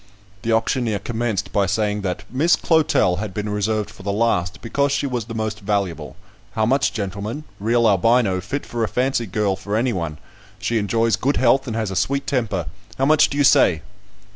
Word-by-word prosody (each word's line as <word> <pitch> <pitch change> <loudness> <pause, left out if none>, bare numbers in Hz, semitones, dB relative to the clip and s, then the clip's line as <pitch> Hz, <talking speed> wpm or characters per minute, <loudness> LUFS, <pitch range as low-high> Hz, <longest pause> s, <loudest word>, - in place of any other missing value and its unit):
The 115 - -1
auctioneer 115 -1 +1
commenced 110 0 -3
by 100 -1 +2
saying, 105 +2 0
that 95 +1 -3
"Miss 150 +7 +3
Clotel 150 - +2
had 100 -2 -5
been 105 0 -3
reserved 105 0 -1
for - - -14
the 100 +1 -2
last, 100 -5 0
because 140 +4 0
she 140 0 0
was 125 -5 -2
the 115 0 -7
most 110 -1 -3
valuable. 100 -4 -2 0.4
How 110 - +1
much, 135 +5 +2
gentlemen? 105 +6 -4 0.2
Real 115 +3 +2
Albino, 105 -1 +3
fit 135 +10 -4
for 120 -1 -3
a - - +1
fancy 125 -1 0
girl 100 0 0
for 100 +2 -4
any 120 +2 +1
one. 85 -5 -3 0.4
She 110 +3 -1
enjoys 115 +3 +1
good 140 +3 0
health, 130 +2 +3
and 115 - -3
has 110 -3 -2
a - - -4
sweet 140 +8 0
temper. 110 - -1 0.3
How 135 - +1
much 155 +1 +5
do 140 - -4
you 145 - +3
say?" 115 - +4
110 Hz, 195 wpm, -21 LUFS, 100-125 Hz, 0.4 s, much